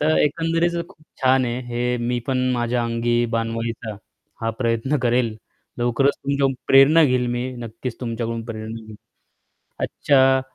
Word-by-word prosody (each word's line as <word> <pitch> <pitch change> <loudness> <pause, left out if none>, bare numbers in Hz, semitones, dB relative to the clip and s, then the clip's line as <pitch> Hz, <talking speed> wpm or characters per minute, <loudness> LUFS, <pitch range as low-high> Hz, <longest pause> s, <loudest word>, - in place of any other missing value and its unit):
तर 155 +1 +3
एकंदरीत 165 +3 +1 0.2
खूप 155 -5 -20 0.2
छान 130 0 +4
आहे, 120 +1 -2
हे 120 +1 -1
मी 120 0 0
पण 130 -1 +1
माझ्या 120 0 0
अंगी 120 +1 +1
बाणवायचा 115 -1 -3 0.4
हा 115 - 0
प्रयत्न 115 +4 0
करेल. 120 -2 +1 0.4
लवकरच 120 +4 +2
तुमच्याकडून 140 -1 +1
प्रेरणा 145 +4 +7
घेईल 125 -3 +2
मी 120 +1 -2
नक्कीच 115 +1 -6
तुमच्याकडून 115 -1 -3
प्रेरणा 110 0 -7
घेईन. 110 - -10 0.9
अच्छा 130 -1 +3
120 Hz, 135 wpm, -22 LUFS, 115-135 Hz, 0.9 s, प्रेरणा